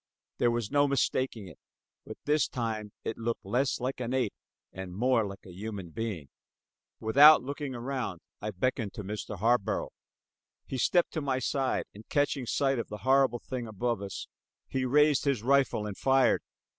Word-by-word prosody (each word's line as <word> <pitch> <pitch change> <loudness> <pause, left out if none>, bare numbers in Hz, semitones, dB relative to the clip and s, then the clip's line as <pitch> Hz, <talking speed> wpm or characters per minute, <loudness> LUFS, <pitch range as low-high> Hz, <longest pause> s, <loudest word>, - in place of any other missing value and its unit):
There 120 - +4
was 120 -3 -2
no 145 0 +4
mistaking 130 -5 0
it; 80 - -13 0.5
but - - -7
this 150 -1 +3
time 110 -4 -3
it 115 - -4
looked 115 -2 -3
less 125 +7 0
like 130 +1 -3
an 125 +1 -2
ape 130 - 0 0.4
and 95 -1 -7
more 125 +2 +3
like 100 0 -10
a 95 - -11
human 100 -2 -6
being. 95 -9 -4 0.7
Without 140 +8 +7
looking 140 0 -4
around 120 -7 -3 0.2
I 105 - -3
beckoned 105 +1 -2
to 105 - -5
Mr. 105 +1 -5
Harborough. 115 +2 +1 0.7
He 130 - -4
stepped 175 +7 +3
to 160 - -2
my 135 -2 0
side, 135 0 0
and 105 +2 -14
catching 145 -3 0
sight 135 0 +1
of 115 - -3
the 105 - -6
horrible 130 -2 +3
thing 125 -3 -4
above 110 0 -2
us, 100 -1 -6 0.4
he 130 -1 -1
raised 150 +1 +4
his 135 -6 +1
rifle 135 -4 +2
and 105 -2 -5
fired. 135 +1 +3
120 Hz, 170 wpm, -29 LUFS, 105-135 Hz, 0.7 s, Without